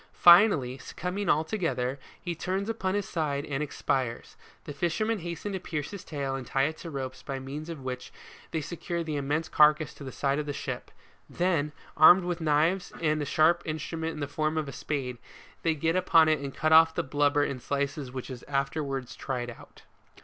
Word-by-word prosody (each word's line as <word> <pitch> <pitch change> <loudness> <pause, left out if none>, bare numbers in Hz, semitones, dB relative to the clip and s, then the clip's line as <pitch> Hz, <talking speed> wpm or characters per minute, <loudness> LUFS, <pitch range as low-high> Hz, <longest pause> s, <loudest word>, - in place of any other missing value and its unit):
Finally, 170 - +6
succumbing 190 +7 -4
altogether, 155 -5 0 0.2
he 175 - -4
turns 190 +5 -2
upon 190 -4 -1
his 205 -1 -1
side 145 -3 -1
and 140 -1 -3
ex 150 - -6
pires. 125 -3 -1 0.3
The 145 - -7
fishermen 215 +8 0
hasten 170 +3 -5
to 190 - -3
pierce 150 -3 -4
his 200 -3 -7
tail 140 -3 -3
and 135 -2 -5
tie 135 +3 +1
to 160 +2 -10
it - - -6
ropes 130 -2 -5
by 135 - -5
means 140 +4 -6
of 155 -5 -7
which 125 -1 -5 0.4
they 160 - -2
secure 170 +2 -4
the 155 -2 -3
immense 145 +3 -1
carcass 150 0 +4
to - - -11
the 130 - -6
side 140 +2 0
of 150 - -3
their 145 - -3
ship; - - -5 0.4
then, 170 -5 0 0.2
armed 175 +4 +8
with 175 -1 -3
large - - -3
knives 160 +5 +2
and 155 -2 +1
a - - -1
sharp 165 +4 +3
instru 160 +1 -4
ment 160 0 -2
in 150 - -7
the 145 - -1
form 155 +2 -1
of 155 -2 -1
a - - -5
spade, 130 -5 -3 0.4
they 165 -1 +1
get 160 +3 0
upon 165 -3 +5
it 155 -1 +3
and 140 -1 -6
cut 155 +1 +1
off 160 0 +7
the - - 0
blubber 145 +1 +2
in 140 -2 -2
slices 140 0 -2
which 130 +1 -6
is 125 -2 -7
afterwards 135 -2 -2
tried 125 -3 -3
out. 115 - -15
150 Hz, 210 wpm, -28 LUFS, 140-170 Hz, 0.4 s, armed